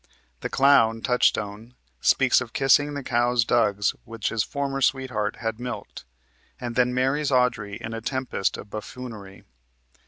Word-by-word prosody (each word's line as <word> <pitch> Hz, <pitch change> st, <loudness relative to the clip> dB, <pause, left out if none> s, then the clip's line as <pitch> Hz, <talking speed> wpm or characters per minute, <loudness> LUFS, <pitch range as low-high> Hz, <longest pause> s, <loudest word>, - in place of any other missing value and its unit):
The -, -, -4 dB
clown, 115 Hz, -5 st, +4 dB
Touchstone, 115 Hz, -2 st, 0 dB, 0.2 s
speaks 130 Hz, -1 st, +4 dB
of 120 Hz, -2 st, -7 dB
kissing 145 Hz, +2 st, +3 dB
the 140 Hz, -, -4 dB
cow's 120 Hz, -1 st, +2 dB
dugs 105 Hz, -4 st, +2 dB
which 115 Hz, -1 st, -4 dB
his 110 Hz, -2 st, 0 dB
former 140 Hz, +1 st, -3 dB
sweetheart 130 Hz, -6 st, 0 dB
had 115 Hz, -1 st, -4 dB
milked, 125 Hz, 0 st, -7 dB, 0.5 s
and 120 Hz, -1 st, -4 dB
then 125 Hz, 0 st, +3 dB
marries 135 Hz, +4 st, +1 dB
Audrey 125 Hz, -6 st, +1 dB
in 110 Hz, -, -6 dB
a 115 Hz, -, -5 dB
tempest 130 Hz, -4 st, -2 dB
of 100 Hz, -, -11 dB
buffoonery. 110 Hz, -3 st, -8 dB
120 Hz, 145 wpm, -25 LUFS, 110-130 Hz, 0.5 s, clown